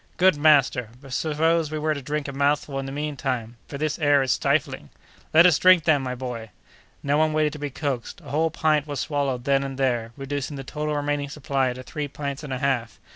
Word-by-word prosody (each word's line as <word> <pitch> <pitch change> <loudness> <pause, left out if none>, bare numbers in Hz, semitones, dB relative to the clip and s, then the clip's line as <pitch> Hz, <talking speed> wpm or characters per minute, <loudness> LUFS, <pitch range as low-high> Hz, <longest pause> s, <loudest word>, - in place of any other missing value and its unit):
"Good, 185 -1 +5
master! 145 -6 +3
but 135 -2 -10
suppose 160 +2 +1
we 155 - -3
were 155 0 0
to 140 - -6
drink 150 +2 -3
a - - -4
mouthful 140 0 0
in 135 - -4
the - - -5
mean 150 +1 -3
time, 120 -4 -3
for 140 - -6
this 155 +2 -2
air 145 -3 +4
is 130 - 0
stifling?" - - 0 0.4
"Let 165 +2 +7
us 175 -4 +5
drink 185 -3 +6
then, 150 -3 +3
my 125 -1 -3
boy!" 120 -3 -6 0.5
No 145 +1 +2
one 155 0 +2
waited 155 -1 +1
to 150 - -8
be 145 0 -3
coaxed. 135 -2 -4
A 145 - -11
whole 160 +3 +2
pint 155 -2 +1
was 145 -3 -4
swallowed 140 -4 -1
then 140 +1 +2
and 135 -1 -5
there, 120 -4 0
reducing 140 +1 -4
the 135 - -6
total 150 +2 -3
remaining 145 -1 -1
supply 135 -2 -1
to 130 +1 -9
three 150 +3 -4
pints 140 0 -5
and 145 - -7
a 130 - -1
half. 130 -4 -1
145 Hz, 230 wpm, -24 LUFS, 135-150 Hz, 0.5 s, Let